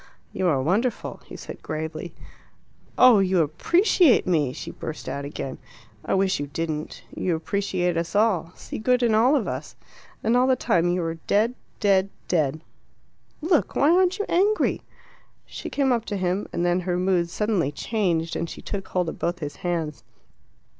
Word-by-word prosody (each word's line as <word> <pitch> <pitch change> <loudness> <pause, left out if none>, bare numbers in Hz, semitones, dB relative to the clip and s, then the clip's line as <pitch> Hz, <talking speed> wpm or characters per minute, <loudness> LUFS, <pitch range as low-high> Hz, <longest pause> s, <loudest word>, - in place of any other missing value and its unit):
"You 185 - 0
are 145 -6 +2
wonderful!" 215 - -1
he - - -10
said - - -9
gravely. 160 +2 -5 0.8
"Oh, 250 -4 +7
you 190 -2 +3
appreciate 330 - +3
me!" 155 -7 +1
she - - -7
burst 160 - -7
out 140 0 -4
again. 135 -2 -6 0.4
"I - - 0
wish 190 -3 +1
you 145 - -3
didn't. 155 +1 -4
You 175 -3 0
appreciate 180 0 -1
us 170 +2 -3
all 195 -6 +2
see - - -7
good 250 +3 +2
in 230 -2 +3
all 240 +7 +4
of - - 0
us. - - -5 0.5
And 225 +2 +2
all 250 +1 +4
the 260 - +4
time 175 -7 +1
you 175 0 0
are 165 0 -3
dead 220 +4 +2 0.3
dead 195 -1 +3 0.2
dead. 155 -3 0 0.8
Look, 325 0 +1
why 290 +3 +4
aren't 370 +1 +3
you 415 - -2
angry?" 405 +5 +2 0.6
She - - -7
came 275 -2 +1
up 235 -2 0
to 205 - -3
him, 185 +2 -1
and 175 - -1
then 175 +1 +2
her 180 -1 -1
mood 180 -2 +1
suddenly 200 -7 0
changed, 170 -1 -1
and 170 - -2
she - - -8
took 195 -2 -5
hold 180 -2 -1
of - - -8
both 175 +1 -1
his 150 -4 -6
hands. 165 -4 -3
185 Hz, 175 wpm, -24 LUFS, 165-225 Hz, 0.8 s, Oh